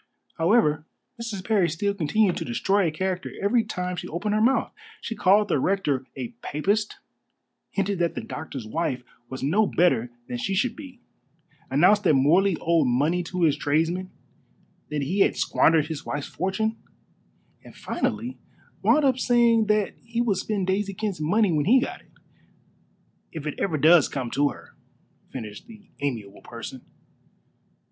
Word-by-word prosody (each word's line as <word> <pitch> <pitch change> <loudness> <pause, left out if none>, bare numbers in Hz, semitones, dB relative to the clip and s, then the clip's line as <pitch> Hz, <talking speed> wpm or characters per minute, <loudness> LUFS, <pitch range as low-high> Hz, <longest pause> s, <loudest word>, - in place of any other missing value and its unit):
However, 160 -5 +2 0.3
Mrs. 205 -5 -5
Parry 200 -6 +2
still 200 +6 -1
continued 195 +2 +1
to - - -3
destroy 195 +10 +1
a - - -1
character 185 +3 -3
every 225 +4 +2
time 180 -4 -4
she - - -6
opened 205 +6 -2
her 215 - +2
mouth. 255 +4 +2 0.3
She 230 - -5
called 205 +1 +4
the 145 - +1
rector 145 -7 0
a 125 -3 -5
Papist; 205 +8 -1 0.7
hinted 195 -1 -1
that 170 -1 0
the - - -4
doctor's 140 -6 -7
wife 130 0 -2 0.3
was 130 0 -6
no 200 +10 +2
better 130 -9 +2 0.2
than 120 - -4
she 195 +10 -1
should 235 +4 0
be; 260 -3 -11 0.7
announced 180 +10 +4
that 155 - +5
Morley 170 +7 +3
owed 165 -3 +2
money 145 +9 +1
to 180 +1 -2
his 155 -4 +4
tradesmen, 165 +5 0 0.8
that 150 -2 -2
he 185 +9 -2
had - - +3
squandered 160 -2 +3
his 155 -2 -6
wife's 145 0 -4
fortune; 220 +5 -2 0.9
and - - -14
finally - - -3 0.4
wound 300 -1 +4
up 265 - +5
by 255 - -10
saying 235 -3 +3
that 210 -1 +1
he 230 0 -4
would 225 -5 +1
spend 200 -1 -2
Daisy 195 +1 -1
Kent's 200 -5 -3
money 200 +5 +2
when 150 -3 +1
he 250 +8 +6
got 260 - -4
it. - - -27 1.2
"If 155 -2 -7
it 150 - -2
ever 165 -6 0
does 160 +1 +5
come 125 -4 -4
to 145 +2 +2
her," - - -12 0.5
finished 110 -5 -8
this 215 -3 -14 0.2
amiable 115 -8 -4
person. - - -8
180 Hz, 165 wpm, -25 LUFS, 150-210 Hz, 1.2 s, he